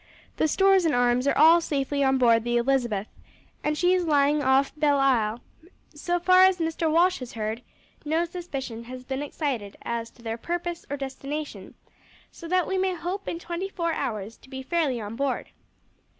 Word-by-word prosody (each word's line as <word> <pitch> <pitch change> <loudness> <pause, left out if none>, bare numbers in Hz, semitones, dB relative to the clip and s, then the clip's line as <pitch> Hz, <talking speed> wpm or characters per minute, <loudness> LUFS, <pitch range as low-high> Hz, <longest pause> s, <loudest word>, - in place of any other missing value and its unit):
The - - +2
stores 385 +3 +4
and 315 - +2
arms 245 +2 +2
are - - +2
all 325 +3 +7
safely 285 -2 -1
on 265 0 +3
board 230 -3 +4
the 240 0 0
Elizabeth, 235 -5 0 0.6
and 300 0 0
she 355 +2 +3
is 365 -1 +2
lying 295 -2 +3
off 270 +1 +2
Belleisle; 270 -7 +2 0.5
so 350 +4 -1
far 370 +1 +6
as 375 -1 +5
Mr. 325 -1 -1
Walsh 355 +3 +3
has 255 -2 -8
heard, 220 +1 -3 0.4
no 320 +3 0
suspicion 275 -10 -6
has 255 +1 -9
been 265 +1 -4
excited 270 -8 -4
as 230 -1 -3
to 235 - -21
their 225 0 -4
purpose 345 +3 -4
or 285 - -3
destination, 275 +2 -6 0.6
so 335 - -10
that 365 +1 +2
we 380 - -1
may 375 -1 0
hope 370 +4 -5
in 335 - -3
twenty 345 +3 -5
four 335 -3 -2
hours 220 -7 -4
to - - -19
be 265 0 -7
fairly 290 -5 0
on 210 0 -6
board." 275 +1 -2
285 Hz, 180 wpm, -26 LUFS, 245-340 Hz, 0.6 s, all